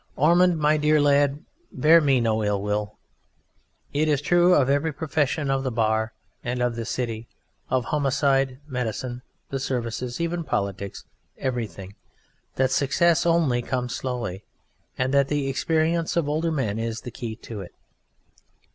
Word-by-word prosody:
Ormond, 175 +3 +4
my 155 0 +3
dear 150 0 +3
lad, 145 0 +2 0.3
bear 165 +2 +5
me 135 -4 +3
no 110 -2 +1
ill 105 -1 +1
will. 105 +1 -2 1.0
It 155 +2 +1
is 150 -2 +2
true 175 +4 +4
of 135 -3 +3
every 145 +3 +1
profession, 145 -1 -1
of 135 0 +1
the 135 - -1
Bar 110 -1 +1 0.3
and 125 +1 -2
of 125 -1 0
the 115 -1 -4
City, 115 -1 -3 0.4
of 130 -2 +1
homicide, 135 -2 +1
medicine, 125 -2 -4 0.3
the 135 - -2
Services, 120 0 -3
even 170 0 -1
Politics 100 - -3 0.3
everything, 110 -7 -4 0.6
that 130 0 +2
success 165 +5 +2
only 160 -8 +2
comes 125 0 -3
slowly, 120 -7 -4 0.5
and 130 +1 0
that 140 -1 +4
the 145 -1 -1
experience 160 +5 0
of 165 -4 +1
older 160 +3 0
men 115 -8 -1
is 115 0 -3
the 125 - -7
key 115 -1 -6
to 110 -2 -8
it. 90 - -11
135 Hz, 150 wpm, -24 LUFS, 115-150 Hz, 1.0 s, bear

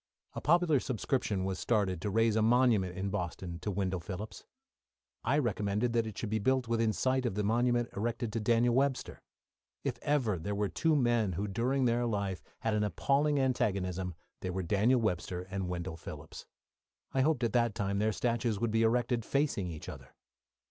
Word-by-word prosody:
A - - -5
popular 165 -2 +4
subscription 115 -6 -1
was 95 -1 -2
started 100 -6 0
to 105 - -1
raise 115 +1 +2
a 110 - +3
monument 110 -6 +3
in 95 +1 -2
Boston 90 -2 -4
to 105 - -4
Wendell 95 -2 -1
Phillips. 100 +4 -7 0.8
I - - +2
recommended 110 -2 0
that 115 -1 +1
it 110 - -8
should 110 - -4
be 110 - +1
built 130 +3 +1
within 115 -1 +2
sight 130 +3 +1
of 120 -6 -1
the 105 - 0
monument 120 +2 +2
erected 115 +1 -2
to 115 - 0
Daniel 115 +2 +3
Webster. 135 +1 0 0.6
If - - -2
there 145 0 +2
were 105 - -2 0.2
ever - - -2
two 160 - +1
men 120 -7 +2
who 100 +5 -2
during 125 +6 0
their 120 0 +2
life 100 -4 -2 0.2
had 110 - 0
an 105 0 +1
appalling 140 +8 +1
antagonism, 95 -9 0 0.2
they 95 - -4
were 95 +1 -2
Daniel 105 +8 +3
Webster 90 -4 -1
and 95 -2 -2
Wendell 85 -1 -4
Phillips. - - -9 0.7
I 135 - +2
hoped 140 -3 +2
at 115 - 0
that 120 -3 +2
time 100 -1 -1
their 110 +1 +2
statues 115 -2 0
would 115 0 0
be 115 +1 +2
erected 120 +1 +2
facing 135 -9 0
each 80 -2 -8
other. - - -10
110 Hz, 185 wpm, -32 LUFS, 100-120 Hz, 0.8 s, popular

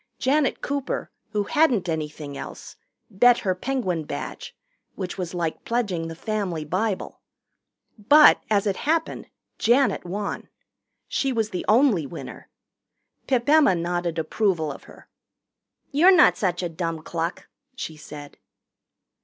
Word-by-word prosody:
Janet 275 +1 +1
Cooper, 280 -2 -3 0.2
who 210 -2 -1
hadn't 245 - +2
anything 150 -3 -4
else, - - -9 0.4
bet 240 +5 +5
her 185 - +1
Penguin 185 -6 -2
Badge, - - -7 0.4
which 185 -2 -5
was 180 -1 -5
like 165 -2 -3
pledging 200 -9 -1
the 165 - -7
family 185 -5 -3
Bible. 190 +5 -2 0.8
But, 295 +9 +7
as 205 -1 +2
it 200 -2 0
happened, 320 +2 -1 0.3
Janet 240 -2 +3
won. 200 +3 -5 0.6
She 270 - -1
was 225 -3 -1
the 180 - -4
only 215 - +4
winner. 165 - -9 0.8
Pip 250 -2 +1
Emma 295 -10 +5
nodded 175 0 -2
approval 160 -1 0
of 135 - -11
her. - - -16 0.8
"You're 325 +7 +6
not - - +6
such 180 -3 -1
a - - 0
dumb 165 -1 -4
cluck," 165 +1 -4 0.3
she 245 -11 -6
said. 150 -1 -11
195 Hz, 130 wpm, -24 LUFS, 165-245 Hz, 0.8 s, But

